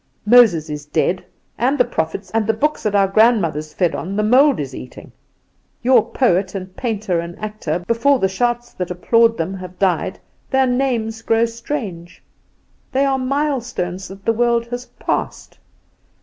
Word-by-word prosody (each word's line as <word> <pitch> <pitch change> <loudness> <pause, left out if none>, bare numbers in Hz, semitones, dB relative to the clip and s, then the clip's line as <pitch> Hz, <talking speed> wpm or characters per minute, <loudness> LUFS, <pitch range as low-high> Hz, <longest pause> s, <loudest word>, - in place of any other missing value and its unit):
Moses 210 -9 +5
is 150 -1 -6
dead, 180 +4 0 0.4
and 260 +5 +2
the 250 - +4
prophets 180 -2 -3
and 220 -2 0
the 220 - +2
books 300 +7 0
that 210 -1 -1
our 195 -1 +4
grandmothers 190 -8 +2
fed 175 -1 0
on 190 +4 -4
the 210 - +1
mould 265 +6 +4
is 135 -3 -4
eating. 125 - -10 0.7
Your 245 -3 +5
poet 190 -6 +1
and 185 -1 -7
painter 210 -7 -1
and 170 +1 -6
actor, 210 -6 -4
before 240 +5 +3
the 195 - +1
shouts 240 +4 -1
that 180 -1 -4
applaud 230 +6 +3
them 165 +3 -2
have 185 -1 -9
died 185 0 0 0.3
their 265 -1 +3
names 245 -3 -1
grow 225 0 +2
strange, 230 - -6 0.7
they 270 +1 +2
are 270 -1 +1
milestones 255 -9 -2
that 195 +1 -12
the 230 - +3
world 235 0 +1
has 245 +1 -5
passed. - - -3
220 Hz, 165 wpm, -19 LUFS, 180-245 Hz, 0.7 s, Moses